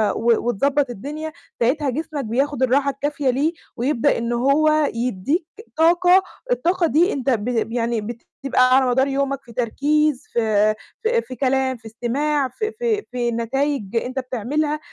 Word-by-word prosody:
و 230 0 +1
وتضبّط 275 +4 +1
الدنيا، 295 +8 -6 0.3
ساعتها 270 +5 +1
جسمك 300 +1 -3
بياخُد 265 +4 0
الراحة 275 +2 +3
الكافية 285 0 -2
ليه 285 +7 +1 0.2
ويبدأ 245 0 +1
إن 235 +1 -2
هو 295 +5 +3
يدّيك 250 - -1 0.3
طاقة، 355 +3 +5 0.3
الطاقة 360 -7 +2
دي 335 +5 +3
أنت 270 -1 -2
ب 230 -1 0
يعني 235 -1 -1
بتبقى 255 +3 0
على 265 - +3
مدار 265 +2 +2
يومك 275 0 -1
في 235 - -14
تركيز، 285 +4 +1
في 215 -2 +2 0.3
في 465 +1 +2
في 255 - -9
كلام، 265 -1 +1
في 225 - -27
استماع، 270 +6 -1
في 430 - -3
في 445 -2 -1
في 240 -1 -1
نتايج 235 -1 -2
أنت 255 +3 -1
بتعملها، 275 +5 -2
270 Hz, 150 wpm, -21 LUFS, 240-300 Hz, 0.3 s, طاقة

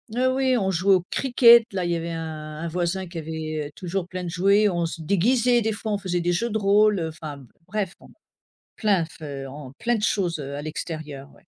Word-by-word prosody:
oh, 255 +1 +2
oui 260 -1 +2
on 190 -4 0
jouait 190 +2 +4
au 180 - 0
cricket 235 -3 +6
là, 185 -2 -1
il 175 - -1
y - - +1
avait 165 0 -4
un 155 -2 -6
un 170 - -3
voisin 180 +2 -2
qui 170 0 -9
avait 155 -1 -4
toujours 180 0 -3
plein 185 0 -5
de 175 - -4
jouets, 200 +4 +3
on 175 -2 0
se 165 0 -5
déguisait 235 +8 +3
des 220 0 0
fois, 215 +1 -4
on - - +1
faisait 180 -3 -1
des 175 +1 +1
jeux 235 +7 0
de 220 - 0
rôle, 210 0 +4
enfin 150 -3 -8 0.2
bref, 195 -2 -2 0.8
plein 200 -6 +2
fe 140 -4 -8
on 135 -1 -9
plein 240 0 +1
de 210 - -5
choses, 185 -6 0
heu, 140 0 -5
à 145 - -5
l'extérieur, 155 -3 -6
ouais. - - -21
180 Hz, 220 wpm, -24 LUFS, 160-210 Hz, 0.8 s, cricket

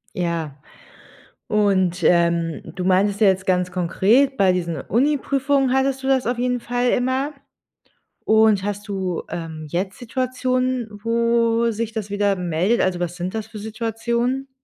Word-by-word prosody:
Ja, 170 -5 -2 0.9
und, 190 -4 +1
ähm, 170 -2 +2
du 180 -1 -4
meintest 195 +3 +2
ja 210 - +6
jetzt 190 0 +1
ganz 180 -1 +1
konkret, 205 +10 +2
bei 190 -6 +4
diesen 170 -4 -2
Uni-Prüfungen 275 - +1
hattest 265 0 +1
du 265 - -2
das 265 -3 +2
auf 245 0 -1
jeden 250 0 0
Fall 245 +1 -1
immer. 260 +4 0 0.9
Und 220 -3 +4
hast 205 0 -4
du, 190 -4 -3
ähm, 160 -2 -6
jetzt 190 +3 -3
Situationen, 255 0 -1
wo 230 0 +2
sich 225 +1 -3
das 210 -3 -5
wieder 205 -1 +1
meldet? 180 +5 0
Also, 180 -1 0
was 175 0 -3
sind 180 +3 -4
das 220 -1 -3
für 215 - -9
Situationen? 235 +4 -2
215 Hz, 150 wpm, -21 LUFS, 180-245 Hz, 0.9 s, ja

